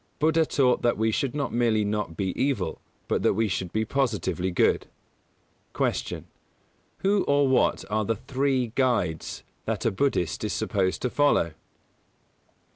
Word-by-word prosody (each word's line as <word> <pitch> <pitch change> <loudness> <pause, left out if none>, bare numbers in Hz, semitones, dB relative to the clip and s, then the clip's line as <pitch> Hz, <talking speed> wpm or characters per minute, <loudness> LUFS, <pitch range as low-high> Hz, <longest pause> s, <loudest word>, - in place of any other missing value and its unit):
Buddha 160 +1 +3
taught 125 -3 +2
that 120 - +2
we 110 +1 +1
should 140 +2 -1
not 145 - -2
merely 115 -3 +2
not 105 -5 -2
be 95 -2 -1
evil, 125 - -1 0.3
but - - 0
that - - +2
we 110 +1 +2
should 90 -2 -3
be 110 0 0
positively 105 - -1
good. 90 - +2 0.9
149. - - -1 0.8
Q. 195 - +3
_Who 205 -1 +3
or 140 0 +4
what 130 - +2
are 110 +1 0
the 115 +2 0
"Three 130 +1 0
Guides" 115 - 0 0.2
that - - -2
a - - +3
Buddhist 95 - 0
Is - - -1
supposed 95 -2 -1
to 125 - 0
follow? 145 - +2
115 Hz, 155 wpm, -26 LUFS, 100-135 Hz, 0.9 s, or